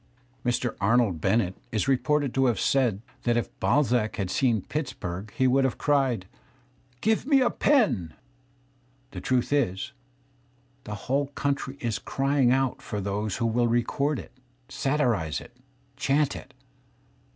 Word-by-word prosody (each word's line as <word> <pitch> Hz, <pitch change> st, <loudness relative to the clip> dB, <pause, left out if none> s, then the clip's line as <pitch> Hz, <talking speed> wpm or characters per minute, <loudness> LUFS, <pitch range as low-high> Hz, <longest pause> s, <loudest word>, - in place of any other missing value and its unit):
Mr. 120 Hz, 0 st, 0 dB
Arnold 105 Hz, -5 st, +2 dB
Bennett 95 Hz, 0 st, +2 dB, 0.2 s
is 110 Hz, +3 st, 0 dB
reported 140 Hz, 0 st, +1 dB
to 135 Hz, -1 st, +3 dB
have 115 Hz, -6 st, +1 dB
said 120 Hz, -7 st, +1 dB, 0.2 s
that 120 Hz, -1 st, +1 dB
if 120 Hz, -, -3 dB
Balzac 125 Hz, -6 st, +2 dB
T -, -, -9 dB
had 95 Hz, -3 st, -2 dB
seen 115 Hz, -7 st, +2 dB
Pittsburgh, 105 Hz, -, -4 dB
he 130 Hz, -, +3 dB
would 135 Hz, +1 st, +4 dB
have 130 Hz, -3 st, 0 dB
cried: 135 Hz, -9 st, +1 dB, 0.4 s
" 125 Hz, 0 st, -36 dB
Give 220 Hz, +4 st, +1 dB
me 280 Hz, -2 st, +5 dB
a 250 Hz, -2 st, +3 dB
pen 200 Hz, -, +2 dB, 0.5 s
!" 130 Hz, 0 st, -37 dB
JThe -, -, -7 dB
truth 130 Hz, +2 st, 0 dB
is, 95 Hz, -10 st, 0 dB, 0.9 s
the 105 Hz, -, -5 dB
whole 140 Hz, +2 st, +1 dB
country 140 Hz, -1 st, -2 dB
is 115 Hz, -4 st, -2 dB
crying 135 Hz, -2 st, +1 dB
out 135 Hz, 0 st, +1 dB
for 105 Hz, -, -4 dB
^ose 100 Hz, +1 st, -2 dB
who 115 Hz, -, -1 dB
.^ -, -, +2 dB
,/ -, -, -1 dB
I -, -, -5 dB
will 120 Hz, -1 st, +3 dB
record 125 Hz, +5 st, +1 dB
it, -, -, -9 dB, 0.4 s
satirize 115 Hz, -, 0 dB
it, -, -, -14 dB, 0.4 s
chant 145 Hz, +1 st, +1 dB
it. -, -, -11 dB
125 Hz, 165 wpm, -27 LUFS, 110-140 Hz, 0.9 s, me